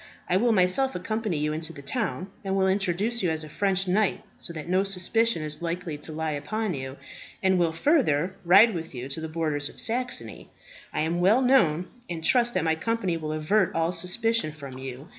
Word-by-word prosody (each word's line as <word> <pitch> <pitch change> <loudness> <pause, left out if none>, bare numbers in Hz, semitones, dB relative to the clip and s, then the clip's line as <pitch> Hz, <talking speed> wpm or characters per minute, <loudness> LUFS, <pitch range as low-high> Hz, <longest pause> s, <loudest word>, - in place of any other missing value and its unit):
I 180 - +1
will 235 +5 +3
myself 215 +7 +2
accompany 215 0 -2
you 150 +1 -1
into 160 +1 0
the 140 - -11
town, 195 - -2
and 195 -1 -1
will 190 -1 +2
introduce 195 +4 0
you 180 - +1
as 160 -1 -2
a 155 - -9
French 190 +3 0
knight, 200 +2 +1
so - - -3
that 155 -1 -7
no 185 +2 +2
suspicion 195 0 0
is 150 +1 -3
likely 170 -1 -3
to 155 - -6
lie 160 0 -2
upon 200 +8 -2
you, 135 -1 -6 0.5
and 190 -1 +3
will, 170 -2 +2
further, 180 - +1
ride 200 +6 +7
with 165 -5 -6
you 125 +1 -5
to 140 +4 -3
the 160 - -5
borders 155 -3 -1
of - - -14
Saxony. 250 +2 -1 0.4
I - - -1
am 165 +2 -1
well 215 +8 +4
known, 185 - +3 0.2
and 165 -2 -5
trust 240 +4 +4
that 185 - +1
my 160 -1 +2
company 190 +2 -1
will 155 -2 -4
avert 165 +5 +1
all 165 +1 +1
suspicion 185 +2 +1
from 140 -4 -9
you. 135 +4 -8
175 Hz, 205 wpm, -26 LUFS, 155-210 Hz, 0.5 s, ride